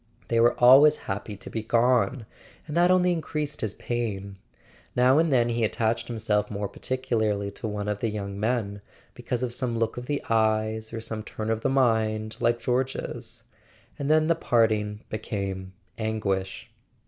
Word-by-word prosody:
They 115 - +2
were 120 +1 +4
always 135 +5 +8
happy 100 +1 -4
to - - -10
be 110 - -2
gone; 120 +1 +2 0.4
and 150 - -6
that 175 +1 +4
only 180 -1 +4
increased 150 -3 -3
his 105 -2 -3
pain. 100 -5 -4 0.6
Now 130 +4 +5
and 165 -1 +2
then 120 -3 +3
he 115 0 0
attached 110 +1 0
himself 110 -3 0
more 100 -1 -3
particularly 110 -4 -1
to 105 - -6
one 105 -1 -4
of 105 -1 -2
the 115 - -1
young 100 -2 -5
men, 105 -3 -1 0.3
because 125 0 -3
of 120 -2 -1
some 120 -2 -1
look 115 0 -1
of 125 0 -6
the 145 -1 -2
eyes 110 0 +1
or 115 -1 -5
some 110 -1 -4
turn 110 +1 -4
of 110 0 -1
the 135 - +1
mind 110 -4 +1
like 120 0 +2
George's; 125 +3 -3 0.6
and 140 0 -2
then 155 0 +4
the 165 - +3
parting 110 -7 +1
became 95 -3 -4 0.3
anguish. 100 -4 -2
115 Hz, 170 wpm, -26 LUFS, 105-125 Hz, 0.6 s, always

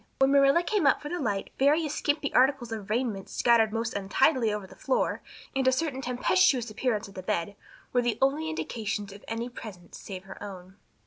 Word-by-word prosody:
When 270 0 +4
Marilla 280 +4 +5
came 375 -4 +1
up - - +4
for 295 - -7
the 355 - -3
light 205 -7 -2
various 295 +2 +3
skimpy 290 -1 -1
articles 255 -2 +3
of 215 -3 -6
raiment 220 -4 -1
scattered 230 -3 +3
most 225 +1 -2
untidily 225 +4 +2
over 210 -2 -3
the - - -14
floor - - 0 0.3
and 265 -1 +1
a - - +6
certain 265 -1 -1
tempestuous 250 0 +2
appearance 220 -2 -1
of 195 - -14
the 185 - -7
bed 185 +1 -2 0.4
were 245 - +4
the 240 -3 0
only 290 +4 +1
indications 210 -9 -4
of 200 - -13
any 230 +1 -3
presence 210 -8 -10
save 190 -2 -8
her 190 0 -11
own. 190 -1 -9
240 Hz, 195 wpm, -28 LUFS, 205-275 Hz, 0.4 s, a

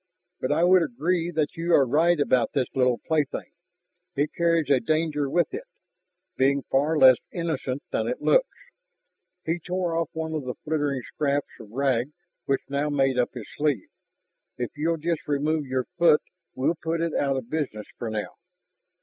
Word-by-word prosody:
But 130 - -1
I 160 +3 +2
would 180 +1 +6
agree 165 +5 0
that 160 -1 -1
you 170 +1 0
are 140 - +5
right 165 +5 +3
about 130 -5 +2
this 135 -3 +1
little 125 -2 +2
plaything; 155 -4 -1 0.6
it 145 +2 0
carries 165 -2 +2
a 135 - +5
danger 155 -1 0
with 175 - +1
it, 455 +5 -5 0.7
being 140 +1 +2
far 150 +4 +2
less 130 -3 +8
innocent 150 -6 -3
than - - 0
it - - -2
looks." - - +4 1.0
He 165 +2 0
tore 175 0 -2
off 165 0 0
one 160 0 -3
of 155 -3 -2
the 125 - -4
fluttering 145 -4 -1
scraps 145 +1 -1
of 110 - -11
rag 130 +2 0 0.3
which 135 -1 +1
now 140 +2 -1
made 135 -3 +2
up 125 - 0
his 120 - -6
sleeve. 145 -9 0 0.7
"If 125 -1 -3
you'll 165 +2 0
just 165 0 -2
remove 150 +1 0
your 130 -1 -1
foot, 170 -3 +5 0.3
we'll 130 +6 +1
put 165 +1 -1
it 165 -1 -1
out 140 -1 +1
of 125 -2 -6
business 140 -9 -2
for 120 - -3
now." 110 -1 -4
145 Hz, 175 wpm, -26 LUFS, 130-165 Hz, 1.0 s, less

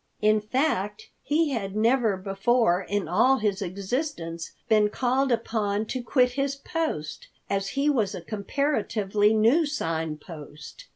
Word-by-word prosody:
In 215 0 +3
fact, 215 -3 -1
he 300 +2 +1
had 200 -6 -3
never 225 -2 +2
before 195 0 +1
in 205 -1 -2
all 255 +10 +4
his 210 -3 -1
existence 190 - -4 0.2
been 215 -1 +4
called 260 +4 +1
upon 220 -3 0
to 255 +3 -4
quit 250 +1 +2
his 275 +1 -1
post, 275 - -4 0.2
as 195 0 0
he 280 +1 +2
was 220 -9 +1
a 180 - -6
comparatively 210 - 0
new 245 +10 +4
Sign 165 - -2
Post. 150 -2 -11
215 Hz, 135 wpm, -26 LUFS, 195-260 Hz, 0.2 s, all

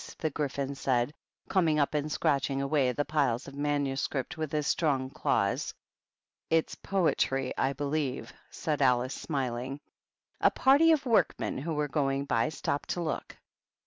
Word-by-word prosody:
^' - - -11
the 155 - -1
Gryphon 140 -1 -2
said, 130 0 0 0.3
coming 165 -5 +2
up, 145 0 +1
and 150 0 -1
scratching 140 -2 +1
away 140 -1 +2
at 125 - -4
the 145 - +1
piles 140 -5 0
of 140 - -9
manuscript 145 +1 -1
with 155 -3 -4
his 150 -1 0
strong 135 -5 +1
claws. 100 -9 0 0.4
" - - -65 0.3
It's 165 0 +2
poetry, 135 -8 0
I 135 - +1
believe,*' 140 -1 -2 0.2
said 150 -2 -2
Alice, 125 0 +3
smiling. 130 -2 -3 0.6
A - - +5
party 285 +5 +5
of 305 -4 +2
workmen, 230 - +1
who 155 +3 -3
were 150 0 0
going 140 -1 0
by, 115 -4 +1
stopped 150 -2 -3
to 175 - -1
look. 160 -2 -4
145 Hz, 160 wpm, -29 LUFS, 135-155 Hz, 0.6 s, A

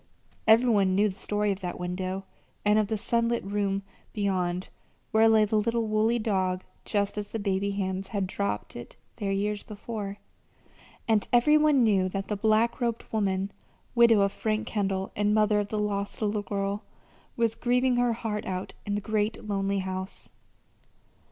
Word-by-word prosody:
Every 225 +3 +6
one 200 -5 +3
knew 210 +2 +4
the 190 - -7
story 210 0 0
of 195 - -3
that 180 -2 -5
window, 185 +2 -3 0.4
and 210 +1 +5
of 215 - +1
the 220 +1 -1
sunlit 235 +2 0
room 200 0 -1 0.3
beyond 185 -3 -1 0.4
where 225 0 +5
lay 220 -1 +5
the 215 +1 +1
little 230 +1 0
woolly 215 +2 +2
dog 190 -4 0 0.2
just 205 0 0
as 205 - -6
the - - -3
baby 200 -1 0
hands 195 -1 -2
had 200 -3 -1
dropped 195 - -3
it 120 - -9 0.2
there 200 -3 -2
years 205 +1 -1
before; 210 -1 -6 0.9
and 220 -3 +2
every 245 +5 +5
one 300 -4 +5
knew 195 -4 +3
that 195 +1 -4
the 210 - 0
black 220 +4 +2
robed 235 -1 -1
woman, 195 -2 0 0.4
widow 235 -3 +6
of 200 0 +2
Frank 215 +1 -1
Kendall 195 -3 -1
and 210 +1 +2
mother 210 -1 +3
of 205 - -1
the 215 - -3
lost 205 -1 -2
little 210 -1 0
girl, 200 0 -2 0.6
was 230 -2 +2
grieving 250 +1 +2
her 245 -1 +3
heart 225 -2 -4
out 185 -1 -4
in 205 - 0
the 205 - -1
great 215 +1 -1
lonely 200 -1 0
house. 190 0 -4
205 Hz, 170 wpm, -28 LUFS, 195-220 Hz, 0.9 s, Every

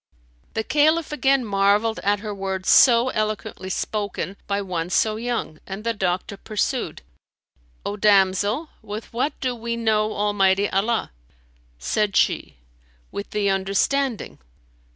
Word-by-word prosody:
The 220 - 0
Caliph 310 +5 +2
again 275 -3 +2
marvelled 205 +2 +2
at 205 0 +1
her 210 -1 -4
words 190 -1 -1
so 240 -1 +6
eloquently 215 -4 -3
spoken 200 -1 -3
by 200 0 0
one 180 -4 -3
so 215 +3 +2
young; 230 -9 -3
and 195 +2 -6
the 230 0 0
doctor 190 -1 -2
pursued, 215 - -2 0.8
"O 205 - -3
damsel, 205 - +3
with 215 +1 -7
what 255 +6 -1
do 255 -2 0
we 235 0 -4
know 215 -2 +1
Almighty 200 -1 +2
Allah?" 215 - 0 0.7
Said 205 - -1
she, - - +1 0.5
"With 200 - -6
the 205 -2 +1
understanding." 205 +6 0
210 Hz, 130 wpm, -23 LUFS, 195-230 Hz, 0.8 s, so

